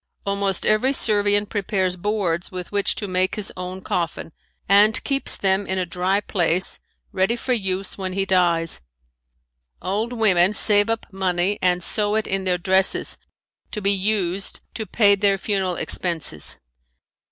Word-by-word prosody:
Almost 200 Hz, -1 st, -1 dB
every 215 Hz, +6 st, +2 dB
Servian 205 Hz, -4 st, +2 dB
prepares 195 Hz, -3 st, -2 dB
boards 185 Hz, -3 st, -2 dB
with 180 Hz, -1 st, -7 dB
which 205 Hz, -1 st, 0 dB
to 205 Hz, -, -4 dB
make 185 Hz, 0 st, 0 dB
his 210 Hz, -2 st, -4 dB
own 185 Hz, +1 st, -7 dB
coffin 170 Hz, -2 st, -3 dB, 0.4 s
and 205 Hz, +3 st, +4 dB
keeps 275 Hz, 0 st, 0 dB
them 195 Hz, 0 st, 0 dB
in 190 Hz, -, -1 dB
a 185 Hz, -, -1 dB
dry 180 Hz, +4 st, -1 dB
place 180 Hz, -3 st, +1 dB, 0.3 s
ready 190 Hz, +5 st, 0 dB
for 255 Hz, +2 st, -2 dB
use 195 Hz, -3 st, -1 dB
when 185 Hz, -1 st, -4 dB
he 195 Hz, 0 st, -1 dB
dies. 170 Hz, -, +1 dB, 1.0 s
Old 210 Hz, +5 st, -2 dB
women 205 Hz, -5 st, +3 dB
save 205 Hz, 0 st, +6 dB
up 225 Hz, 0 st, -2 dB
money 190 Hz, +1 st, -1 dB
and 180 Hz, -1 st, +1 dB
sew 210 Hz, +2 st, +2 dB
it 220 Hz, -, 0 dB
in 195 Hz, 0 st, -2 dB
their 180 Hz, -1 st, +1 dB
dresses, 190 Hz, +2 st, +1 dB, 0.5 s
to 210 Hz, -, -5 dB
be 200 Hz, -1 st, +1 dB
used 195 Hz, -1 st, -1 dB
to 220 Hz, -2 st, -6 dB
pay 205 Hz, +1 st, +4 dB
their 200 Hz, 0 st, +2 dB
funeral 190 Hz, -2 st, -1 dB
expenses. 165 Hz, -, -2 dB
195 Hz, 150 wpm, -21 LUFS, 180-205 Hz, 1.0 s, save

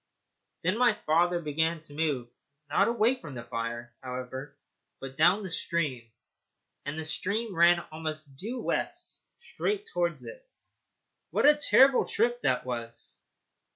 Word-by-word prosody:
Then 185 Hz, +7 st, +1 dB
my 250 Hz, -1 st, +5 dB
father 175 Hz, +3 st, +3 dB
began 160 Hz, +1 st, 0 dB
to 150 Hz, -2 st, -11 dB
move, 145 Hz, -6 st, -1 dB, 0.4 s
not 195 Hz, +7 st, +4 dB
away 235 Hz, +2 st, +2 dB
from 145 Hz, -5 st, -8 dB
the 120 Hz, -, -6 dB
fire, 115 Hz, +1 st, -5 dB
however, 130 Hz, +2 st, -6 dB, 0.4 s
but 135 Hz, 0 st, -8 dB
down 180 Hz, +7 st, +4 dB
the 190 Hz, -, -5 dB
stream, 140 Hz, -10 st, -2 dB, 0.7 s
and 145 Hz, +2 st, -4 dB
the 160 Hz, -, -4 dB
stream 205 Hz, +7 st, -2 dB
ran 170 Hz, +1 st, +5 dB
almost 155 Hz, -3 st, -5 dB
due 225 Hz, -, -5 dB
west -, -, -2 dB
straight 420 Hz, -3 st, -3 dB
towards 170 Hz, -2 st, 0 dB
it. -, -, -10 dB, 0.9 s
What -, -, +1 dB
a 295 Hz, +1 st, +8 dB
terrible 275 Hz, -2 st, +5 dB
trip 240 Hz, +3 st, +1 dB
that 130 Hz, -, +1 dB
was! 115 Hz, -2 st, -6 dB
160 Hz, 140 wpm, -29 LUFS, 135-210 Hz, 0.9 s, a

